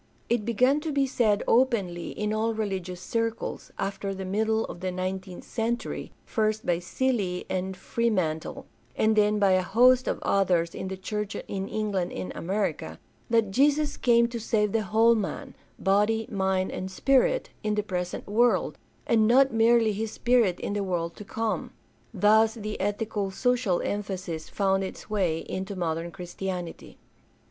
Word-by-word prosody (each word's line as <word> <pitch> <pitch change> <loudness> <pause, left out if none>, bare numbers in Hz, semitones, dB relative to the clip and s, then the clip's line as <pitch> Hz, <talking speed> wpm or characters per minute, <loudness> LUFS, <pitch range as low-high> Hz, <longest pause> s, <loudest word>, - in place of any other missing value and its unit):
It 235 -3 +1
began 250 +5 +3
to 310 0 -3
be 280 -1 +2
said 220 -6 +1
openly 215 -9 +2
in 210 0 -2
all 220 +1 0
religious 190 -4 -3
circles, 230 +4 -3
after 195 0 -3
the 190 0 -5
middle 220 +3 +1
of - - -8
the 185 +1 -2
nineteenth 185 0 -4
century, 235 +1 -3
first 215 0 0
by 170 -1 +1
Seeley 195 -2 -1
and 185 0 -2
Freeman 185 -11 0
tie, - - -8 0.3
and 220 0 +2
then 210 0 +3
by 200 -2 +4
a 185 0 +4
host 250 +7 +4
of - - 0
others 180 -4 +2
in - - -5
the 190 0 -5
church 210 +1 -4
in 195 -1 -4
England 200 -5 -2
and 95 -1 -5
America, 195 +4 -2 0.3
that 225 -4 +2
Jesus 290 +5 +2
came 235 -1 +4
to 235 -1 -4
save 210 -2 +1
the 225 - +1
whole 220 +3 +4
man 215 -4 -3 0.2
— - - -36
body, 220 +3 +2
mind, 190 -2 0
and 185 - -4
spirit 270 - +2
— - - -34
in 215 -1 0
the 210 - 0
present 180 -3 -4
world, 235 +4 +2 0.3
and 220 -2 +3
not 265 +3 +5
merely 225 0 +4
his 215 +1 -3
spirit 235 -8 +2
in - - -2
the 205 -1 -1
world 170 -3 -2
to - - -9
come. 220 +2 -3 0.4
Thus 220 +2 +4
the 215 -1 -5
ethico 205 0 -2
social 245 -4 +1
emphasis 185 -6 -4
found 195 -1 +1
its 190 - -8
way 175 -6 +1
into 190 +2 -4
modern 165 -1 -2
Christianity. 175 0 -6
210 Hz, 165 wpm, -27 LUFS, 185-225 Hz, 0.4 s, not